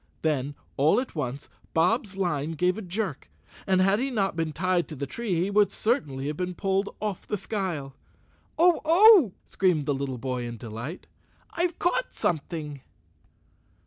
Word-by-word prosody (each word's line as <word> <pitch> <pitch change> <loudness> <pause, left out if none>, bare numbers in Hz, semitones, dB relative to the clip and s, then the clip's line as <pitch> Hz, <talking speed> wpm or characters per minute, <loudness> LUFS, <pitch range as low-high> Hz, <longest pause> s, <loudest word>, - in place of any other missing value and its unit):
Then, 145 -2 0 0.2
all 145 - +4
at 260 - -5
once, 140 -2 -4 0.3
Bob's 200 +4 +1
line 165 -5 -1
gave 180 +3 +1
a 220 - -5
jerk 195 +3 -4 0.4
and 190 -1 +3
had 195 +2 +3
he 270 +2 0
not 200 -8 0
been 165 -1 -1
tied 180 +2 0
to 155 - -8
the 140 0 -3
tree 210 - -3
he 180 +4 0
would 205 -1 +4
certainly 150 - -1
have 150 +1 -3
been 180 0 -3
pulled 195 +2 0
off 210 -3 -4
the 210 - -1
skyle. 175 -10 -3 0.6
"Oh! 345 0 +5
Oh!" 340 - +7
screamed 180 -6 +1
the 145 - +1
little 135 -2 -3
boy 125 0 -3
in 120 -1 -6
delight, 115 - -7 0.5
"I've 345 0 -1
caught - - 0
something!" 150 -3 -3
180 Hz, 165 wpm, -26 LUFS, 145-210 Hz, 0.6 s, Oh